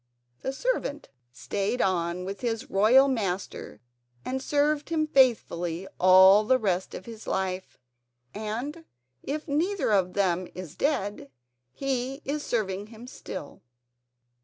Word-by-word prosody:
The 265 - -2
servant 295 - -2 0.2
stayed 205 - -2
on 180 -2 0
with 195 +1 -6
his 230 -2 -3
royal 230 +8 +6
master 200 -8 -3 0.4
and 260 +1 -2
served 295 +2 +1
him 320 -2 +1
faithfully 195 - +2
all 190 +3 +8
the 255 +4 +3
rest 190 -5 -1
of - - -8
his 225 -2 -10
life; 185 -1 -3 0.6
and, 240 +10 -5 0.4
if 300 +3 -4
neither 315 - 0
of 185 -3 +2
them 185 -2 +1
is 180 -5 -7
dead, 205 - -1 0.4
he 270 - -3
is 290 +2 -2
serving 205 -6 -2
him 225 +1 -12
still. 200 - -8
220 Hz, 125 wpm, -27 LUFS, 190-275 Hz, 0.6 s, all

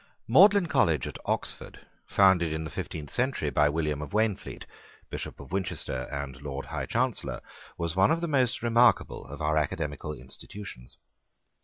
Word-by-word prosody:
Magdalene 195 - +7
College 85 - +2
at - - -6
Oxford, - - -3 0.2
founded 95 -4 +4
in 80 0 -2
the 80 - -6
fifteenth 75 -2 -6
century 125 - 0
by 75 +2 +4
William 75 -1 -1
of 75 - -7
Waynflete, 110 -2 -1 0.5
Bishop - - -6
of - - -11
Winchester 85 -9 -2
and 70 -2 -5
Lord 70 -1 -5
High - - -4
Chancellor, - - -1 0.4
was 85 -1 -2
one 95 +2 +5
of 165 - +2
the 170 - -2
most 130 -7 +1
remarkable 120 - +3
of 75 +2 -7
our 75 +1 +2
academical 75 0 -2
institutions. 85 -4 -10
80 Hz, 155 wpm, -28 LUFS, 75-115 Hz, 0.5 s, Magdalene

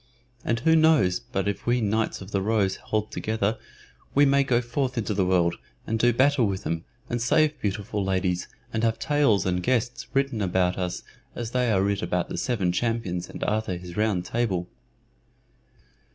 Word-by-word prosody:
And 115 0 0
who 160 +4 +4
knows 155 - +4
but 95 - -3
that - - -2
if 100 - -11
we 120 +1 +3
Knights 110 -1 0
of 95 +2 -9
the 100 - 0
Rose 105 -2 +1
hold 105 0 -2
together 110 0 -1 0.6
we 145 +1 +6
may 140 0 +4
go 125 -3 +2
forth 125 +2 -2
into 110 -2 -1
the 95 -2 +1
world, 85 -2 +2 0.3
and 110 0 -1
do 120 +1 +4
battle 130 0 +3
with 95 -1 -3
them, 80 +1 -3 0.2
and 120 -1 -2
save 150 +5 +2
beautiful 100 0 -2
ladies, 95 -2 0 0.3
and 110 0 -1
have 115 -1 +2
tales 140 -6 +2
and 90 -1 0
gestes 120 -1 0
written 135 -4 0
about 90 -1 +1
us 90 -1 -3 0.3
as 120 -1 -4
they 125 -2 +1
are 95 -2 +3
writ 100 0 0
about 90 0 -1
the - - -4
Seven 100 -8 0
Champions 95 -4 -2
and - - -6
Arthur 105 -4 -1
his 90 0 -9
Round 105 -5 0
table." 95 -6 -1
110 Hz, 185 wpm, -26 LUFS, 95-120 Hz, 0.6 s, we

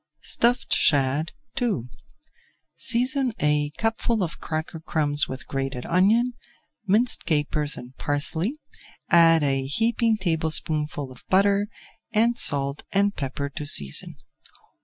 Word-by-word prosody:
STUFFED 245 +2 +1
SHAD 145 +2 +2 0.3
II 220 - 0 0.9
Season 255 +1 0
a 150 0 +1
cupful 225 -1 0
of 170 - -5
cracker 160 0 -5
crumbs 150 -2 0
with 130 0 -7
grated 135 -2 -4
onion, 220 +8 +2 0.5
minced 225 +5 +2
capers 150 -1 0
and 125 +2 -11
parsley, 160 - 0 0.5
add 165 -2 +6
a 135 -1 0
heaping 225 - +1
tablespoonful 155 -5 -2
of 125 - -15
butter, 200 +2 +3 0.4
and 230 +2 +2
salt 140 -8 +1
and 200 +1 +1
pepper 140 0 -4
to 145 +1 -7
season. 70 - +4
160 Hz, 115 wpm, -24 LUFS, 145-215 Hz, 0.9 s, add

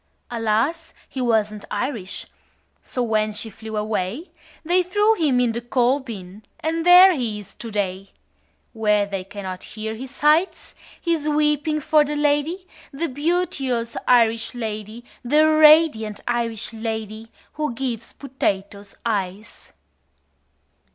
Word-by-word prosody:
Alas, 235 +9 -1
he 265 - -5
wasn't 215 -3 0
Irish. 210 -4 -3 0.6
So 250 - -3
when 215 -2 +1
she 215 +1 -4
flew 220 +1 -7
away, 210 - -3 0.3
They 355 +3 +3
threw 415 +5 +2
him 305 - +1
in 245 -2 +2
the 235 +1 -4
coal 245 +3 +1
bin 205 -6 -9 0.2
And 325 +1 -1
there 360 +2 +8
he 235 -8 -2
is 205 -2 -10
to 230 - -8
day, 195 -2 -3 0.6
Where 210 -2 +2
they 195 -2 -4
cannot 190 -1 -7
hear 220 0 -5
his 255 +4 -8
sighs 300 +6 +1 0.3
His 325 -3 0
weeping 300 0 +1
for 300 +1 +4
the 295 +1 -3
lady, 295 +5 0 0.3
The 320 +4 -3
beauteous 275 -6 -1
Irish 230 -1 +3
lady, 220 0 -5 0.2
The 300 +5 +4
radiant 305 -9 +5
Irish 230 -2 -2
lady 220 0 -5 0.2
Who 300 -2 -2
gives 240 -3 -4
potatoes 200 -7 -3
eyes." 205 -2 -4
240 Hz, 130 wpm, -22 LUFS, 215-300 Hz, 0.6 s, there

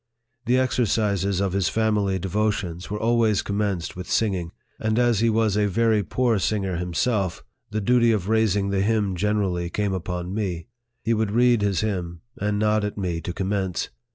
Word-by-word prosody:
The 125 +1 +4
exercises 105 -7 +1
of 100 -2 0
his 95 -3 +1
family 105 -3 +1
devotions 95 -2 -2
were 105 +1 -3
always 115 -2 +2
commenced 100 -4 -2
with 90 0 -7
singing; 95 -6 0 0.3
and, 110 0 0
as 120 -3 +3
he 115 +1 +3
was 110 -2 +2
a 105 0 +2
very 110 +2 +2
poor 115 +3 +1
singer 95 -3 -1
himself, 90 +2 -1 0.3
the 110 - -2
duty 120 +2 +4
of 100 -4 -1
raising 105 -3 +2
the 95 -1 +1
hymn 105 -2 +1
generally 95 -3 0
came 100 +2 -1
upon 90 0 -4
me. 95 -6 -3 0.4
He 115 - +1
would 110 -2 0
read 120 +1 +3
his 100 -3 +1
hymn, 90 -6 -3
and 105 0 -1
nod 105 0 +2
at 105 0 -3
me 90 -4 -2
to 85 - -4
commence. 95 0 -2
105 Hz, 175 wpm, -24 LUFS, 95-110 Hz, 0.4 s, The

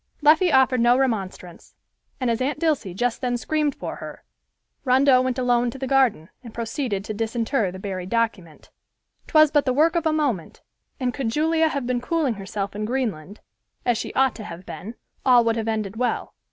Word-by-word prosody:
Leffie 320 +4 +5
offered 260 -2 +4
no 240 +1 +5
remonstrance, 195 -9 -3 0.4
and 250 -3 0
as 230 - -2
Aunt 280 +3 -1
Dilsey 295 - 0
just 245 +4 -1
then 245 -2 0
screamed 300 +3 -1
for - - -6
her, - - -9 0.6
Rondeau 260 0 +4
went 255 0 -1
alone 245 -1 +2
to 235 - -8
the 265 - -4
garden 255 - +2
and 230 -3 -11
proceeded 230 -3 -3
to 215 - -4
disinter 225 -1 -1
the 185 - -8
buried 185 -2 -5
document. 220 -9 -2 0.6
'Twas 310 -2 +5
but 290 -2 +2
the 255 - +2
work 320 +5 +3
of 335 -1 +1
a - - +2
moment, 275 - -2 0.4
and 250 -2 -1
could 265 -5 -2
Julia 320 +5 +2
have 280 -4 -3
been 245 0 -1
cooling 295 -1 0
herself 200 0 -5
in 210 - -3
Greenland, 215 - -3 0.4
as 245 - +3
she - - -4
ought 265 -1 +3
to 220 - -7
have 175 -1 -9
been, 220 +5 -8 0.3
all 245 -3 +5
would 230 -1 +2
have 225 -1 -3
ended 215 -2 -2
well. 250 +1 -2
245 Hz, 190 wpm, -23 LUFS, 215-270 Hz, 0.6 s, Leffie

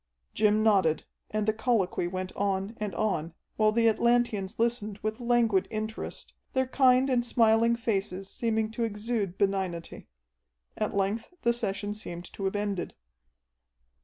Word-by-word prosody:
Jim 215 0 +3
nodded, 190 -8 +3 0.3
and 215 0 -1
the 215 - +2
colloquy 220 -6 0
went 185 +1 -4
on 195 +2 -1
and 210 -4 -3
on, 170 -6 -1 0.2
while 215 -1 +3
the 230 +1 +3
Atlanteans 230 -3 +1
listened 225 -3 0
with 215 +2 -2
languid 235 -5 +2
interest, 220 0 -5 0.2
their 260 -1 +2
kind 255 0 +4
and 250 -3 +2
smiling 230 -1 +4
faces 195 -4 -1
seeming 220 0 -1
to 235 - -5
exude 210 -3 -2
benignity. 190 -4 -2 0.7
At - - -2
length 200 - -1
the 235 0 +4
session 205 -3 -2
seemed 175 -4 -6
to 195 - -4
have 190 - -1
ended. 205 -3 -2
215 Hz, 140 wpm, -28 LUFS, 195-230 Hz, 0.7 s, kind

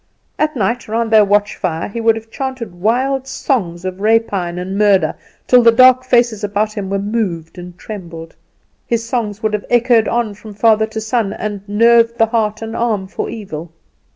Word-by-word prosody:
At 305 0 0
night, 230 +2 -1
round 225 +1 -1
their 215 -1 +7
watch 205 +1 +1
fire, 165 -1 -3
he 230 +3 -5
would 225 0 +3
have 225 0 -9
chanted 260 -7 -5
wild 255 +8 0
songs 185 -11 -2
of 185 +1 -5
rapine 205 -5 +1
and 185 +2 -4
murder, 200 -2 +3 0.3
till 250 -1 +5
the 230 -1 +6
dark 255 +2 +6
faces 240 -4 +1
about 210 +1 -1
him 200 -3 -5
were 195 - -1
moved 195 -5 -3
and 175 0 -10
trembled. 170 -7 -9 0.5
His 230 -1 -1
songs 220 -3 -3
would 215 -1 0
have 210 - -2
echoed 240 -2 +3
on 235 -3 -1
from 210 +1 -12
father 220 0 +3
to 220 0 -5
son, 220 -2 -1
and 210 -2 -5
nerved 230 +2 +4
the 225 - +4
heart 220 -1 -1
and 225 0 -6
arm 225 -5 -1
for 190 - -5
evil. 175 -7 -7
220 Hz, 185 wpm, -17 LUFS, 195-235 Hz, 0.5 s, their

